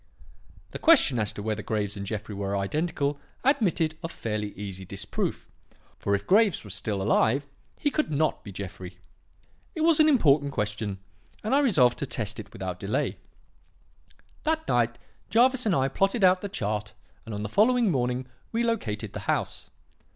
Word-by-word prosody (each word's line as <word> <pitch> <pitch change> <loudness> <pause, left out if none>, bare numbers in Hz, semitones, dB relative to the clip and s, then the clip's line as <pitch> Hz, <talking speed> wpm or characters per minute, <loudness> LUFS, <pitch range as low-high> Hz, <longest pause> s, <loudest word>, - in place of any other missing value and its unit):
"The - - -6
question 265 - +5
as 105 -1 0
to 100 - -7
whether 110 0 -2
Graves 105 -2 -2
and 100 -1 -6
Jeffrey 105 0 -4
were 100 0 -2
identical 145 - -1 0.2
admitted 170 - +2
of 165 -1 -5
fairly 105 -2 -3
easy 95 -2 -6
disproof; 100 +2 -3 0.5
for 100 - +1
if 100 0 -4
Graves 205 0 +4
was 100 -4 -6
still 105 -1 -2
alive, 125 +7 +2 0.3
he 290 - 0
could 305 +2 0
not 155 +1 0
be 100 - -8
Jeffrey. 95 -1 -8 0.8
It 320 - -3
was 320 -1 +4
an 310 0 +7
important 145 - +4
question 105 -2 -2 0.5
and 215 - 0
I 280 - +5
resolved 155 - +4
to 140 - -2
test 110 -4 -3
it 100 -2 -9
without 90 -1 -5
delay. 100 +2 -1 1.2
That 315 +1 -1
night, 120 0 +1 0.3
Jervis 250 +1 +4
and 195 - +3
I 135 -1 +2
plotted 195 - +1
out 185 0 +5
the 205 - -4
chart, 105 - -3 0.3
and 110 - -4
on 105 - -4
the - - -2
following 225 - +3
morning 125 -2 0 0.3
we 230 +1 0
located 135 - -2
the - - -4
house. - - -1
125 Hz, 170 wpm, -27 LUFS, -, 1.2 s, an